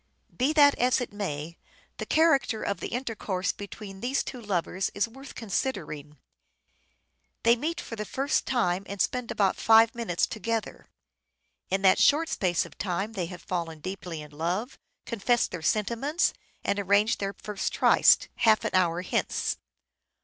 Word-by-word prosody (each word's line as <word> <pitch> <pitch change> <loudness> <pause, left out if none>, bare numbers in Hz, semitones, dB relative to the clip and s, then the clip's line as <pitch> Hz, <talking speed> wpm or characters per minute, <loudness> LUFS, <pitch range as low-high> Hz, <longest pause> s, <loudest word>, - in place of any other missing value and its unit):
Be 260 +4 +2
that 290 -2 +7
as 250 +2 +3
it 245 - -5
may, 170 -5 -5 0.4
the - - -5
character 310 -8 +3
of 200 - -2
the - - -4
intercourse 220 -6 -2
between 200 -1 -9
these 255 +6 0
two 250 -3 -7
lovers 190 -2 -1
is 200 +3 +1
worth 270 +4 -12
considering. 165 - -4 1.3
They 235 +1 +6
meet 310 +7 -3
for 230 - -6
the 210 - -4
first 270 +7 -1
time 195 -8 +1
and 200 0 -6
spend 250 +2 0
about 195 -2 +1
five 225 0 +6
minutes 225 -8 0
together. 225 0 -4 0.8
In 195 +1 0
that 190 -1 +5
short 320 +3 +4
space 175 -4 +1
of - - -15
time 195 +3 -2
they 180 -5 -2
have 180 0 -10
fallen 165 -3 -3
deeply 175 -2 -6
in 150 - -13
love, 175 - -3 0.3
confessed 235 +1 +1
their 180 - -5
sentiments 235 - +1 0.3
and 200 - 0
arranged 200 +3 +2
their 195 0 -2
first 210 -2 -3
tryst, - - +5
" - - -45
half 215 -1 +5
an - - 0
hour 180 -1 +2
hence." - - -1
205 Hz, 160 wpm, -27 LUFS, 185-240 Hz, 1.3 s, that